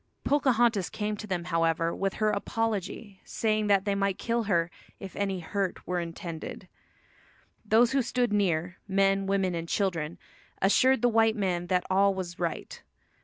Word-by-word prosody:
Pocahontas 240 -8 +2
came 210 0 -3
to 215 - -7
them, 180 -3 -2
however, 165 -1 0
with 195 0 -1
her 215 -1 +1
apology, 205 -1 -3
saying 215 -1 0
that 200 -1 +3
they 200 - +1
might 195 -1 0
kill 235 -1 -1
her 170 -4 +1 0.3
"if 195 -2 -9
any 195 -2 -1
hurt 190 +2 -3
were 180 -1 -1
intended." 170 -1 -6 1.0
Those 225 +2 +4
who 270 0 +2
stood 245 -2 0
near, 180 -3 0
men, 195 0 +2
women 195 -2 +1
and 165 -1 -4
children, 170 -5 -1 0.4
assured 255 +6 +3
the - - +6
white 225 -1 +3
men 180 -4 -1
that 180 0 +1
all 195 +1 +3
was 175 -2 -5
right. 170 -3 -4
195 Hz, 160 wpm, -28 LUFS, 175-215 Hz, 1.0 s, the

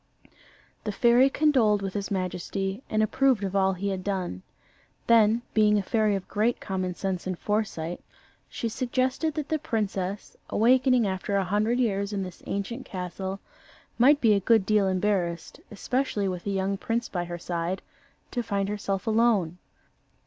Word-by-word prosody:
The 210 - -2
fairy 240 +5 +5
condoled 250 -9 +3
with 195 -1 -3
his 200 -1 -3
majesty, 190 +2 -3
and 215 0 +2
approved 255 0 +2
of 195 0 -3
all 190 0 +3
he 195 +2 -3
had 190 -1 -3
done. 185 - -3 0.6
Then, 230 0 +4
being 210 -1 +4
a 200 - 0
fairy 215 0 +1
of 195 - -5
great 220 +3 0
common 185 -2 -3
sense 190 -2 -3
and 185 -2 -2
foresight, 185 -6 -2 0.5
she 230 - -3
suggested 260 +5 -1
that 300 -2 -3
the 315 - 0
princess, 200 -6 -3
awakening 250 +1 +4
after 190 +1 -2
a 195 - +2
hundred 210 +6 +1
years 200 -4 0
in 195 -1 -1
this 180 -1 -9
ancient 215 +6 -3
castle, 190 -2 -5 0.6
might 285 +4 +6
be 225 -5 +4
a 200 - +3
good 220 0 +3
deal 210 -1 +3
embarrassed, 185 -3 -1
especially 215 -1 -1
with 180 0 -4
a - - +1
young 195 0 -1
prince 230 +3 -2
by 175 -2 -3
her 175 0 -5
side, 175 +2 -3 0.5
to 245 - -1
find 200 -3 -1
herself 200 -1 -2
alone. 215 -7 +2
200 Hz, 165 wpm, -27 LUFS, 190-230 Hz, 0.6 s, might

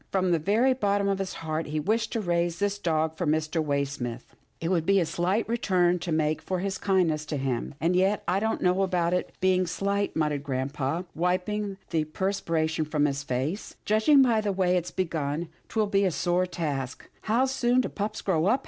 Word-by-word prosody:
From 185 -2 +1
the 170 - +3
very 220 - +3
bottom 200 -4 +1
of 195 -1 0
his 195 -1 -3
heart 155 0 -2
he 155 +1 -2
wished 220 +8 0
to 225 - 0
raise 175 -2 0
this 205 +2 -1
dog 160 -3 0
for 175 0 -2
Mr. 155 +1 +1
Waysmith. 140 -5 -3 0.3
It 165 - -2
would 175 -3 +2
be 195 +3 +4
a 175 - +2
slight 185 +7 0
return 185 -6 +2
to 170 0 -4
make 155 0 +1
for 185 - -2
his 190 +1 -3
kindness 175 -6 +1
to 150 - -2
him, 130 0 -2
" - - -37
and 170 +3 +1
yet 190 +3 +2
I 190 - +2
don't 220 +2 -1
know 180 +1 +3
about 180 -2 +1
it's 180 - 0
being 185 -1 +2
slight," 200 +3 -1
muttered 150 -3 0
grampa, 140 +4 -2
wiping 190 +4 -1
the 160 -3 +1
per 190 +5 -1
spiration 160 -4 -1
from 150 -1 +2
his 140 -1 -1
face, 140 - -3
" - - -43
judging 220 +7 +5
by 230 -4 +3
the 210 -1 0
way 185 -1 +2
it's 180 -1 -1
begun, 160 -3 -2 0.2
'twill 220 -1 +1
be 200 -1 +2
a - - +3
sore 175 +2 0
task 145 -7 -4
— - - -34
How 240 +4 +4
soon 255 -1 +2
do - - -2
pups 210 +1 -4
grow 175 -3 +1
up. 255 +6 +3
180 Hz, 215 wpm, -27 LUFS, 155-200 Hz, 0.3 s, judging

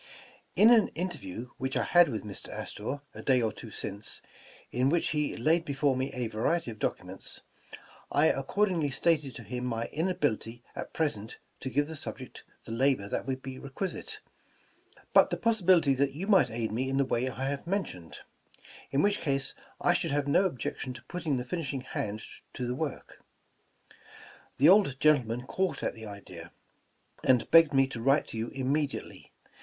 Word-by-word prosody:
''In 230 +3 +8
an 220 - +4
interview 125 - -4
which 130 +1 -1
I - - +2
had 175 -1 +5
with 110 - -3
Mr 105 -2 -7
Astor, 135 +7 -5
a - - -8
day 130 -2 +3
or 110 -2 +1
two 115 - -9
since, 100 0 -5 0.5
in 125 +2 +2
which 170 +2 +1
he 150 -1 -1
laid 165 +2 +3
before 140 -2 +1
me 130 +1 -1
a 125 -3 -3
variety 115 +6 0
of 110 - -11
documents, - - -4 0.7
I 145 +2 +4
accordingly 165 +2 +1
stated 140 -2 +1
to 115 - -8
him 125 +4 -5
my 115 -2 -1
inability 135 - -1
at - - -6
present 115 -9 -1 0.2
to 130 - -4
give 145 +4 +2
the 160 - -6
subject 135 -3 -8 0.2
the - - -8
labor 125 -3 +2
that - - -3
would 130 0 -3
be 130 -1 -6
requisite, 195 - -4 0.9
but - - +7
the - - -1
possibility 185 -10 +4
that 135 +1 +1
you 165 +7 -4
might 195 -3 +5
aid 115 -1 -2
me 130 +4 -1
in 135 - 0
the 140 - +3
way 130 0 0
I 130 +1 -4
have 140 +3 -4
mentioned; 170 - -3 0.7
in 140 - +2
which 205 0 +2
case 135 -2 0 0.3
I - - +3
should - - 0
have 145 0 0
no 165 +7 +4
objection 130 -4 -3
to 120 -1 -12
putting 160 -1 -2
the 125 - -3
finishing 140 -3 -3
hand 110 -4 -4 0.3
to 125 - -3
the 120 - -1
work. 145 +1 -5 1.3
The 140 +4 +6
old 185 -8 +5
gentleman 125 -6 +3
caught 190 +5 -1
at - - 0
the 110 -2 -9
idea, 90 -4 -10 0.7
and 125 -3 +3
begged 165 -3 +7
me 135 0 +6
to 125 -4 -6
write 135 +4 +3
to 115 0 -3
vou - - -9
immediate! 140 +2 0
v. - - -14
135 Hz, 180 wpm, -30 LUFS, 120-160 Hz, 1.3 s, In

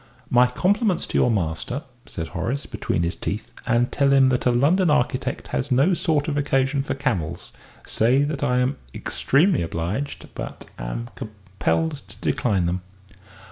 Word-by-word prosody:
"My 125 +1 +6
compliments 190 - +1
to - - -2
your - - +4
master," 105 - -2 0.2
said 80 -1 -5
Horace, 115 - -3
between 85 - -2
his 85 +1 -1
teeth, 110 +3 -4 0.2
"and 120 0 +2
tell 140 -1 +2
him 135 -1 +6
that 125 0 +1
a - - +5
London 160 +9 +3
architect 130 -2 0
has 145 - -2
no 140 +9 +4
sort 160 -5 +1
of 145 -2 -1
occasion 135 -1 +1
for 135 - -3
camels. 115 - -2 0.3
Say 125 +5 +3
that 145 -1 -2
I 125 - +2
am 130 +3 0 0.2
extremely 160 +4 +2
obliged 85 - -3
but - - -7
am 90 - -5
compelled 110 +8 -2
to 110 - -13
decline 100 -4 0
them." 90 +2 -1
125 Hz, 160 wpm, -23 LUFS, 105-145 Hz, 0.3 s, My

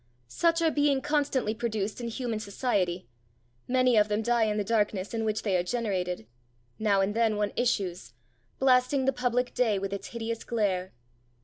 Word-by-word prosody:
Such 335 - +1
are 325 - +3
being 290 -2 +2
constantly 285 -6 0
produced 220 -1 -3
in 235 - -3
human 230 -1 -3
society; 200 - -1 0.6
many 255 -2 +3
of 210 0 +5
them 210 +1 -1
die 235 0 +2
in 210 -1 -1
the 210 - +1
darkness 205 -2 0
in 225 -1 -1
which 215 0 -1
they 200 -4 +1
are - - +2
generated; 180 - -2 0.5
now 205 -3 +3
and 195 +2 0
then 225 -1 +2
one 205 -1 -1
issues, 185 - -1 0.4
blasting 260 +1 +3
the 270 - +2
public 250 0 0
day 225 -5 +2
with 195 0 -3
its 200 - -5
hideous 230 -1 -4
glare. 190 -5 -1
220 Hz, 175 wpm, -28 LUFS, 200-250 Hz, 0.6 s, of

